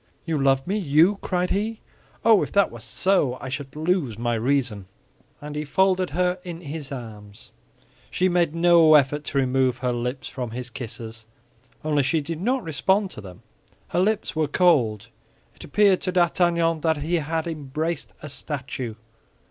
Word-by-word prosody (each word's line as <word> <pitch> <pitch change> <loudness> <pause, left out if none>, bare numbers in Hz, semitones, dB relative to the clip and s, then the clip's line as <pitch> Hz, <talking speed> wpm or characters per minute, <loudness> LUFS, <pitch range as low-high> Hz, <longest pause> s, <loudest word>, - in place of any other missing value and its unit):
"You 160 -4 -1
love 135 -1 +3
me, 200 +4 -1
you!" 170 +4 +4
cried 180 -1 -1
he. 215 +3 -1 0.5
"Oh, 225 -4 +6
if - - -3
that 200 0 +3
were - - -9
so, 180 -10 +1
I 130 - -6
should 135 0 -6
lose 155 - 0
my 120 +1 -1
reason!" 120 -4 0 0.5
And 150 0 -8
he 150 - -2
folded 185 +4 +2
her 180 +3 0
in 170 -2 -7
his 150 -2 -6
arms. 105 -5 -9 0.6
She 185 - +1
made 175 -3 +1
no 165 -2 +6
effort 145 +1 +3
to - - -3
remove 130 -1 +2
her 125 -1 -1
lips 125 +3 -3
from 125 -2 -5
his 125 +2 -6
kisses; 115 -2 -8 0.6
only 150 -2 +2
she 140 +4 +1
did 160 +2 -5
not 250 +4 0
respond 190 +6 +1
to - - -9
them. 90 -3 -12 0.5
Her - - 0
lips 205 0 0
were 155 -1 +1
cold; 125 - +2 0.4
it - - -14
appeared 200 +3 +3
to 185 - -1
D'Artagnan 170 -2 +2
that 160 -1 +1
he 160 +4 0
had 160 +1 -2
embraced 155 0 -4
a 150 - -6
statue. 130 -5 -5
150 Hz, 170 wpm, -24 LUFS, 130-175 Hz, 0.6 s, Oh